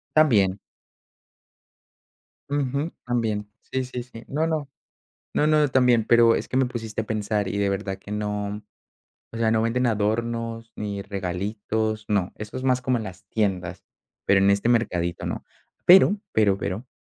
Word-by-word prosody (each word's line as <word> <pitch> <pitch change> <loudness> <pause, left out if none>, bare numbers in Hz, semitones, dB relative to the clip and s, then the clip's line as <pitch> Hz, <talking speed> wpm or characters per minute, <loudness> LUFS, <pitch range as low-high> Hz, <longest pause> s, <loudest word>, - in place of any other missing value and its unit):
También. 105 -11 +4 1.9
Ujú, 145 +2 -1
también. 110 -4 -1
Sí, 130 -1 -3
sí, 125 -1 -5
sí. 120 -2 -12
No, 155 +4 0
no, 155 -4 -2 0.7
no, 150 - +3
no, 150 -2 +4
también, 125 -3 +4
pero 115 0 +5
es - - -2
que 130 - -2
me 130 - +4
pusiste 115 -3 -4
a - - -10
pensar 105 -2 -1
y 100 - -3
de 100 -1 +2
verdad 95 0 -3
que 100 - -13
no 105 0 -3 0.7
o - - -4
sea, 115 -1 +2
no 110 0 +2
venden 125 +2 +1
adornos, 115 +1 -1
ni 100 -1 -4
regalitos 105 +3 -2
No, 100 -3 0
eso 105 +3 -7
es - - -6
más 125 -1 +2
como 125 -1 +1
en 110 - -5
las 95 -2 -9
tiendas, 95 -5 -1 0.4
pero 100 - +5
en 100 - +5
este 100 +4 +2
mercadito 90 -8 0
no. - - -3 0.4
Pero, 190 +3 +8 0.2
pero 100 -3 +3
pero, 105 +7 -4
110 Hz, 160 wpm, -24 LUFS, 100-125 Hz, 1.9 s, Pero